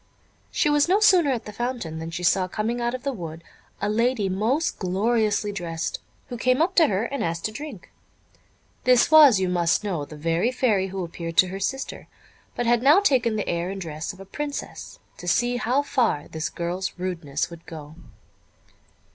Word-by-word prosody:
She - - +1
was 295 +2 +3
no 390 +3 +4
sooner 370 -8 +5
at 250 -4 -1
the 210 - -8
fountain, 235 -9 -4
than 160 0 -5
she 175 +2 -5
saw 185 +2 +3
coming 225 +5 -2
out 240 +1 -1
of 255 - -8
the 280 -1 -1
wood 165 -5 -7 0.4
a 205 - -1
lady 225 -1 +1
most 230 - 0
gloriously 210 +2 +1
dressed, 165 -4 -4 0.3
who 245 - -5
came 255 +2 +2
up 345 +4 +2
to 325 -3 +7
her, 195 +1 0
and 275 +3 -3
asked 165 0 -2
to 215 - -1
drink. 295 +7 -9 0.9
This 250 +3 +4
was, 295 -9 +8
you 190 - 0
must 175 +1 +1
know, 180 -8 -2
the 150 - -10
very 165 +9 0
Fairy 215 -7 +1
who 190 -1 -4
appeared 165 -1 -6
to 185 - +6
her 195 +1 -5
sister, 270 +7 -4 0.5
but 240 - -1
had 235 0 +3
now 290 +8 +6
taken 250 - +2
the 210 - -2
air 170 +1 -1
and 195 0 -5
dress 160 -3 -5
of 185 - -16
a 195 - -10
princess, 290 +8 -6 0.2
to 175 - -9
see 240 +6 +2
how 250 +4 +1
far 230 - 0
this 160 0 -4
girl's 175 +2 -3
rudeness 170 -3 -3
would 170 -1 -12
go. 155 -3 -9
205 Hz, 195 wpm, -24 LUFS, 175-250 Hz, 0.9 s, was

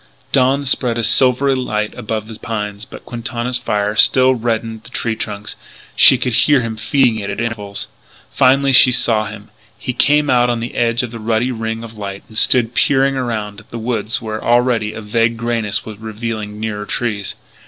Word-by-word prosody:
Dawn 135 +1 +2
spread 125 -3 0
a 115 - -1
silvery 130 +4 +3
light 105 -4 -2
above 110 0 -4
the 115 - -9
pines, 105 -1 -5
but - - -12
Quintana's 120 +1 -3
fire 105 -4 -1
still 130 +3 +5
reddened 115 -2 -3
the - - -15
tree 115 -1 -2
trunks; 105 -2 -6
and - - -27 0.3
she 130 - +7
could 125 -1 -2
hear 130 +4 +4
him 115 -2 -3
feeding 115 +1 +1
it 100 -1 -5
at - - -4
intervals. 105 -4 -3 0.4
Finally 135 +1 +3
she 130 0 +6
saw 115 -3 +2
him. 105 -1 -11 0.3
He 125 - -4
came 145 +4 +3
out 125 -2 +3
on 120 -1 -1
the 115 +1 -5
edge 120 +1 0
of 120 - -5
the 115 - -7
ruddy 115 +3 0
ring 115 -1 -4
of 115 -1 -9
light 100 -1 -6
and 110 - -16
stood 120 +1 +5
peering 135 +1 +2
around 110 -5 -3
at 105 - -19
the 115 - -7
woods 115 -1 -1
where 110 -1 -5
already 120 -3 +2
a 115 - -8
vague 115 +2 0
greyness 115 -3 -2
was 110 -2 -9
revealing 110 -1 -5
nearer 105 -2 -4
trees. 105 -5 -3
115 Hz, 195 wpm, -17 LUFS, 110-125 Hz, 0.4 s, she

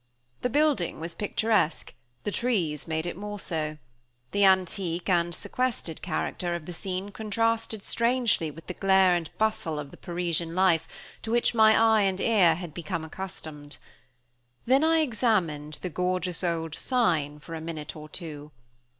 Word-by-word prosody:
The 250 - 0
building 285 - +1
was 165 +1 -5
picturesque; 210 -2 0 0.3
the 205 - -2
trees 180 - 0
made 160 0 -1
it 175 - -3
more 205 +1 -5
so. 155 -5 -3 0.5
The 205 0 +2
antique 185 -2 +2
and 175 -2 +2
sequestered 245 -11 -2
character 175 0 -2
of 170 -3 -6
the 180 - -6
scene 190 +3 -4
contrasted 220 0 -1
strangely 235 -8 +1
with 165 +2 -12
the 180 - -5
glare 190 -1 +4
and 170 -3 -2
bustle 215 -8 0
of 145 -1 -6
the - - -13
Parisian 170 -2 -2
life, 180 -4 +3 0.3
to 220 - -6
which 235 +1 +2
my 220 -1 +6
eye 220 -1 +5
and 190 -1 +1
ear 190 -8 +4
had 175 -2 -7
become 165 0 -4
accustomed. 155 -4 -8 0.9
Then 265 +4 +4
I 325 0 +4
examined 195 - 0
the 180 - -2
gorgeous 180 +1 -1
old 165 -2 -1
sign 160 - +1
for 150 +3 -10
a 160 - -4
minute 160 -2 -6
or 155 0 -9
two. 150 -3 -7
180 Hz, 160 wpm, -27 LUFS, 160-215 Hz, 0.9 s, my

